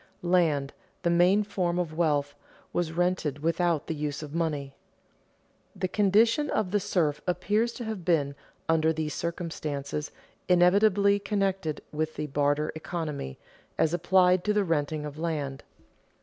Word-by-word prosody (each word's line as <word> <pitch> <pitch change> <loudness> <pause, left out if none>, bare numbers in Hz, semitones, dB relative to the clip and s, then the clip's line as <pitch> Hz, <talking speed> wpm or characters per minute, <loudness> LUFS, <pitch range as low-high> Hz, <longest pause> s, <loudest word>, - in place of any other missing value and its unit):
[Sidenote: 175 - -2
Land, 150 -6 +2 0.3
the 170 - +2
main 180 +4 +4
form 185 -4 -1
of 170 -3 -2
wealth, 145 -4 +1 0.4
was 175 -2 0
rented 165 -4 -1
without 165 -1 +1
the - - -3
use 150 -1 -3
of 150 -1 -8
money] 150 -5 -2 1.0
The 185 -1 -1
condition 220 +9 +3
of 200 -4 0
the 205 - +2
serf 160 -6 0
appears 210 +6 +1
to 245 - -6
have 220 -5 -5
been, 150 -5 +1 0.3
under 160 0 +3
these 155 -1 -3
circumstances, 150 -4 -4 0.4
inevitably 200 +3 +4
connected 195 -6 -1
with 155 +1 -2
the 150 - -3
"barter 145 +1 0
economy" 155 - -5 0.4
as 160 - +2
applied 180 0 +4
to 210 - +2
the 210 -1 +2
renting 155 -3 -1
of 150 +1 -7
land. 150 -5 -3
170 Hz, 145 wpm, -28 LUFS, 150-185 Hz, 1.0 s, main